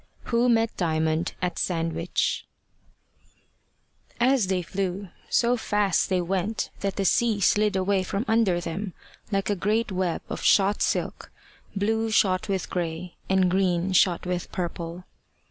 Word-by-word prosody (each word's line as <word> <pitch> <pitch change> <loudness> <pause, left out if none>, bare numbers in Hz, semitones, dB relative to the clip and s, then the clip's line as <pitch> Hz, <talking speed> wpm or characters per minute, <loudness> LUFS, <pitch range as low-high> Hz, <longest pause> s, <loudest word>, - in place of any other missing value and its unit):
WHO 240 +1 +2
MET 225 -1 +2
DIAMOND 160 -1 0
AT 180 - -1
SANDWICH 165 -1 -1 1.7
As 250 -3 +3
THEY 185 -1 0
flew, 190 +1 -3 0.2
so 240 +1 +3
fast 205 -5 +1
they 185 -1 +2
went 195 +5 -2
that 195 -1 -2
the 195 - -1
sea 220 +3 +2
slid 210 +1 +3
away 190 +1 +1
from 200 +4 -3
under 220 -6 +3
them 175 +3 -4 0.4
like 195 0 0
a - - +1
great 210 +4 0
web 185 -2 -1
of - - -5
shot 200 +1 +3
silk, - - -1 0.4
blue 220 +3 0
shot 190 -2 +2
with 190 -2 -1
grey, 170 0 -4 0.2
and 190 -1 +3
green 185 -1 +1
shot 180 -1 +3
with 180 -1 -3
purple. 175 0 -4
190 Hz, 140 wpm, -26 LUFS, 180-210 Hz, 1.7 s, As